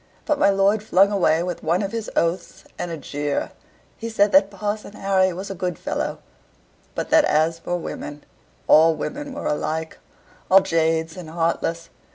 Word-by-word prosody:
But 300 -2 0
my 200 - +5
lord 200 +2 +3
flung 200 -1 +3
away 170 -5 +2
with 180 -1 -4
one 170 +5 +1
of 195 - -3
his 225 -1 -4
oaths, 170 +2 -1 0.2
and 175 - -3
a 165 - -4
jeer; 145 0 -3 0.5
he 230 - -5
said 205 -2 +2
that 195 0 +5
Parson 205 +1 -4
Harry 190 -2 +2
was 190 +3 -6
a - - -3
good 180 -2 -3
fellow; - - -3 0.8
but - - -4
that - - +6
as 160 +2 +1
for 175 +1 -2
women, 145 -3 -7 0.4
all 160 +1 +6
women 290 - -5
were 275 - -6
alike 160 +2 -2 0.5
all 195 +1 +7
jades 160 -2 0
and 180 -4 -9
heartless. 165 0 -2
180 Hz, 175 wpm, -22 LUFS, 160-200 Hz, 0.8 s, all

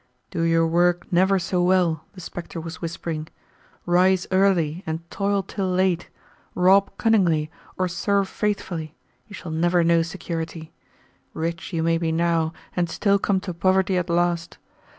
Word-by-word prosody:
"Do 165 - -2
your 165 0 +3
work 175 +1 +2
never 190 +2 +4
so 180 0 -1
well," 175 -4 +2
the 185 - -11
spectre 170 0 -7
was 160 0 -8
whispering 165 -2 -4 0.6
"rise 180 +1 +3
early 185 -4 +2
and 160 +1 -4
toil 200 0 0
till 190 -1 -3
late, 180 -1 +1 0.5
rob 190 +2 +5
cunningly 170 -9 +2 0.3
or 185 - +1
serve 195 +3 0
faithfully, 175 -7 -3 0.3
you 205 - -10
shall 175 -3 -7
never 175 +2 +2
know 165 0 +4
security. 165 -1 -5 0.6
Rich 170 +4 -3
you 165 -2 -1
may 165 0 +2
be 165 -1 -1
now 165 -1 +1 0.2
and 175 -2 0
still 200 +4 +2
come 195 -1 +1
to 185 -2 -5
poverty 185 +2 +2
at 180 -1 -1
last. 170 0 0
175 Hz, 150 wpm, -23 LUFS, 165-190 Hz, 0.6 s, rob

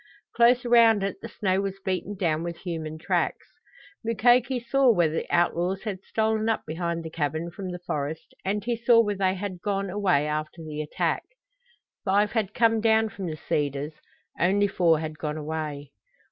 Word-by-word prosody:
Close 240 +1 +4
around 230 -4 +5
it 195 - -2
the - - -6
snow 190 -3 0
was 195 -1 -4
beaten 190 +2 -2
down 165 -5 0
with 170 0 -4
human 160 -3 -5
tracks. 160 - -1 0.6
Mukoki 240 +3 +3
saw 265 +2 +3
where 175 -7 +2
the 160 - -3
outlaws 175 +2 +1
had 200 -4 -4
stolen 220 0 0
up 225 - -1
behind 170 +1 -3
the 160 - -7
cabin 160 +2 -2
from 190 +1 -6
the 180 - -4
forest 150 0 -4
and 205 +2 -1
he 240 +2 0
saw 230 0 +4
where 210 -3 +3
they 190 -1 +1
had 185 -2 -5
gone 195 -1 -1
away 185 -7 +2
after 155 +2 -3
the 155 -1 -5
attack. 150 - -1 0.8
Five 205 +1 +2
had 215 -3 -1
come 225 -2 +3
down 220 0 +3
from 195 -3 -6
the 155 -1 -4
cedars, 145 0 -2 0.5
only 200 +4 +3
four 170 -4 +3
had 155 -1 -5
gone 150 0 -3
away! 150 -2 -5
190 Hz, 175 wpm, -26 LUFS, 160-220 Hz, 0.8 s, around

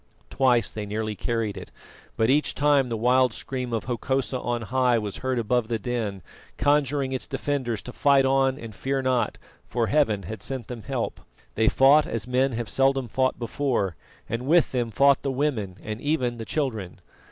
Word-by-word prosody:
Twice 125 -5 +3
they 105 -1 -5
nearly 110 +1 -3
carried 115 +1 -2
it, - - -8 0.5
but 110 - +3
each 135 +1 +2
time 145 -3 +3
the 115 - -2
wild 125 +1 +3
scream 125 -2 -4
of 115 -2 -1
Hokosa 130 +2 -1
on 120 -1 -2
high 125 +1 +2
was 105 -3 -3
heard 130 -1 -2
above 120 0 +1
the 115 - -1
din, 110 -5 -3 0.3
conjuring 145 -2 +2
its 130 - -3
defenders 135 -5 -2
to 125 - -8
fight 140 -1 +4
on 135 0 +2
and 115 -4 -8
fear 135 +5 -2
not, 125 -4 0 0.3
for 120 -1 0
Heaven 110 -7 +1
had 105 +4 -7
sent 130 -3 -5
them 120 -2 -6
help. 130 0 -3 0.3
They 110 0 +1
fought 140 +3 +5
as 115 -2 -3
men 130 +1 +1
have 115 -1 -3
seldom 135 -1 +2
fought 130 +4 +1
before, 120 - -1 0.3
and 120 +3 -4
with 165 +1 +4
them 120 -3 -1
fought 140 +4 +4
the 140 - -2
women 130 -9 -1
and 110 +2 -5
even 130 -5 0
the 115 - -6
children. 110 - -3
125 Hz, 185 wpm, -25 LUFS, 115-135 Hz, 0.5 s, fought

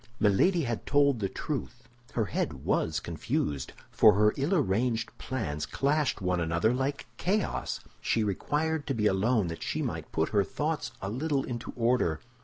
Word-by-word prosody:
Milady 160 - +3
had 120 -3 -3
told 140 -3 +4
the 100 -2 -1
truth—her 120 -5 -5
head 90 - -3
was - - +1
confused, 70 -4 -2 0.2
for - - +7
her 105 +2 +4
ill 145 +8 +1
arranged 115 - 0
plans 75 - -3
clashed 145 -3 +1
one 90 -1 +1
another 85 +7 +2
like 135 +2 -1
chaos. 200 +3 -1 0.2
She 110 - +1
required 150 - -1
to 135 - 0
be 105 -2 0
alone 105 +2 +3
that 80 - -6
she - - -2
might - - -4
put 80 - 0
her 100 -2 +3
thoughts 150 +7 -2
a 95 - -2
little 140 +3 0
into 120 -1 -5
order. 115 -10 +2
120 Hz, 160 wpm, -29 LUFS, 100-140 Hz, 0.2 s, for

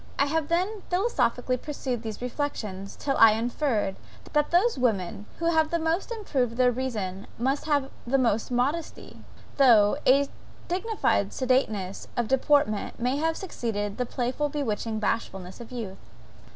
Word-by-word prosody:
I 280 - +4
have 310 +1 0
then 375 +6 0
philosophically 360 - +1
pursued 260 -4 -4
these 220 0 -6
reflections 220 -7 -4
till 275 -1 -1
I 225 -1 +8
inferred, 230 -3 -1 0.4
that 295 -1 +2
those 385 +8 +3
women 210 -5 -1
who 335 0 +1
have 315 -1 +2
most 325 +6 0
improved 265 - -1
their 250 -1 +5
reason 215 -7 -3
must 270 +5 0
have 285 -3 +1 0.2
the 270 +3 +3
most 230 -4 +1
modesty 270 +7 -2 0.3
though 235 -4 +6
a 275 +2 +5 0.4
dignified 370 - 0
sedateness 220 -7 0
of 240 -2 +1
deportment 265 -4 +2
may 250 +3 0
have 320 +2 0
succeeded 215 - -3
the 250 - 0
playful, 255 +5 -1
bewitching 225 -6 -2
bashfulness 195 -3 -3
of 235 - -11
youth. 220 -6 -6
255 Hz, 140 wpm, -27 LUFS, 220-295 Hz, 0.4 s, I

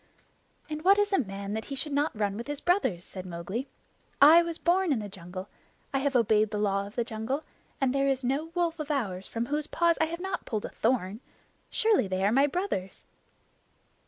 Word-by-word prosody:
"And 305 0 -5
what 395 +2 +6
is 410 0 +2
a - - +4
man 200 -4 -4
that 220 0 -3
he 275 - -5
should 300 +2 -3
not 290 0 +1
run 200 -2 0
with 235 +4 -6
his 290 -1 -4
brothers?" 260 - +1
said 185 - -8
Mowgli. 185 +8 -5 0.5
"I 315 +4 +9
was 335 -1 -3
born 360 0 +2
in 275 - +3
the 210 -2 -4
jungle. 185 -1 -8 0.5
I 270 - +2
have 275 0 0
obeyed 215 -2 +4
the 210 - -3
Law 200 -1 0
of 205 - -13
the 240 - +1
Jungle, 230 +6 -3 0.4
and 265 -2 +2
there 275 0 +2
is 270 -1 0
no 270 +5 0
wolf 340 -2 0
of 305 -1 -4
ours 200 -10 -2
from 230 0 -2
whose 295 +3 -1
paws 340 0 +2
I - - +5
have 335 +1 -5
not 380 0 -3
pulled 215 -4 -3
a - - -5
thorn. 220 -4 0 0.5
Surely 440 - +2
they 190 +1 0
are 205 - +3
my 275 +4 +4
brothers!" 290 - -3
260 Hz, 215 wpm, -28 LUFS, 205-310 Hz, 0.5 s, I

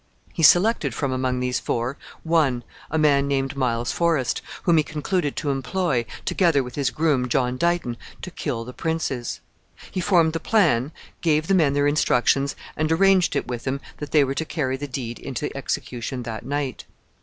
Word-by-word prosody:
He - - -3
selected 175 - +5
from 140 -2 -1
among 130 -1 -1
these 125 -1 0
four, 120 +4 -2 0.3
one, 150 -7 +2 0.3
a 160 - -1
man 140 -2 +3
named 135 0 -1
Miles 120 -3 0
Forest, 165 -7 +1 0.2
whom 170 -3 +4
he 155 - +4
concluded 155 0 -2
to 145 - -1
employ, 135 - -1 0.2
together 165 -7 +2
with 125 0 -8
his 140 -3 0
groom, 130 -1 +1
John 125 -1 +1
Dighton, 170 -5 0 0.3
to 185 - -6
kill 125 -8 -3
the 125 - -8
princes. 160 -7 -3 0.5
He 185 - -2
formed 170 -4 +3
the 165 - -1
plan, 155 - +2 0.3
gave 155 -2 +2
the 195 - +1
men 155 -7 +4
their 145 0 +2
instructions, 140 -1 +2 0.2
and 155 0 0
arranged 190 +1 +4
it - - -1
with 120 -1 -4
them 135 +1 -2 0.2
that 150 - -6
they 150 -2 +5
were 135 0 -1
to 160 - -2
carry 145 -5 -2
the 145 +2 -5
deed 120 -3 -5
into - - -4
execution 125 +1 -4
that 115 -2 -6
night. 140 0 -3
140 Hz, 180 wpm, -23 LUFS, 125-160 Hz, 0.5 s, selected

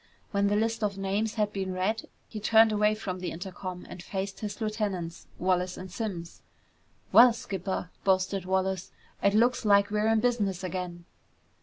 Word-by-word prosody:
When 200 0 +2
the 205 - +2
list 225 +1 0
of 200 -1 0
names 200 +3 -1
had 210 -2 0
been 190 -1 -2
read, 200 +5 -1 0.2
he 215 - -6
turned 220 +1 +5
away 210 0 +3
from 185 -4 -5
the 180 - -3
intercom 180 +1 -6
and 180 - -9
faced 195 +1 -4
his 210 -1 -5
lieutenants, 205 -6 -3
Wallace 180 0 0
and 185 0 -8
Simms. 180 -5 -5 0.7
"Well, 240 0 +8
skipper," 190 -4 -4
boasted 190 0 +1
Wallace, 190 0 -1 0.3
"it 200 +1 +3
looks 245 +3 +3
like 200 -1 +4
we're 210 +1 +1
in 225 0 +4
business 210 -6 0
again!" 180 -1 -4
200 Hz, 165 wpm, -28 LUFS, 185-215 Hz, 0.7 s, Well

